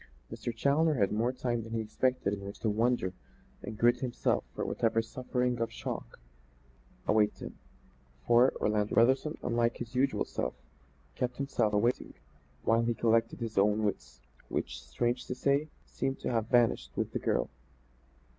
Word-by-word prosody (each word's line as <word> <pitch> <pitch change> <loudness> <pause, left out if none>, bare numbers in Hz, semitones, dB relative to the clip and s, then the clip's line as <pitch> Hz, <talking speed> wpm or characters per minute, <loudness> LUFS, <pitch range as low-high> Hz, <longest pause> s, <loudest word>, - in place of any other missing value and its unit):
Mr. 120 - -4
Challoner 145 +7 +2
had 100 -6 +2
more 115 +4 +1
time 120 -2 -2
than 115 +1 -8
he 115 - 0
expected 110 -1 0
in 100 - -4
which 100 +1 -7
to 110 - 0
wonder 115 -3 +1 0.5
and 110 - -7
gird 120 +2 +4
himself 125 -2 0
for - - -2
whatever 115 -1 +1
suffering 125 +1 -1
or 115 - 0
shock - - -6 0.9
awaited 105 -1 +3
him. - - -8 0.7
For, 120 +2 +6
Orlando 105 -1 0
Brotherson, 130 +6 +3
unlike 120 0 +1
his 120 0 -7
usual 130 +2 +1
self, 65 - -3 0.6
kept 125 0 -2
him 140 - -2 0.3
waiting 120 +4 0 0.5
while 115 +1 +3
he 115 0 0
collected 115 +1 +1
his 110 -3 -1
own 105 +2 +3
wits, 65 - -3 0.3
which, - - -3
strange 120 - -1
to 125 - -3
say, 140 +4 +1 0.2
seemed 135 0 -2
to - - -1
have 115 -2 0
vanished 120 -2 +3
with - - -1
the - - -1
girl. - - 0
115 Hz, 160 wpm, -31 LUFS, 110-125 Hz, 0.9 s, For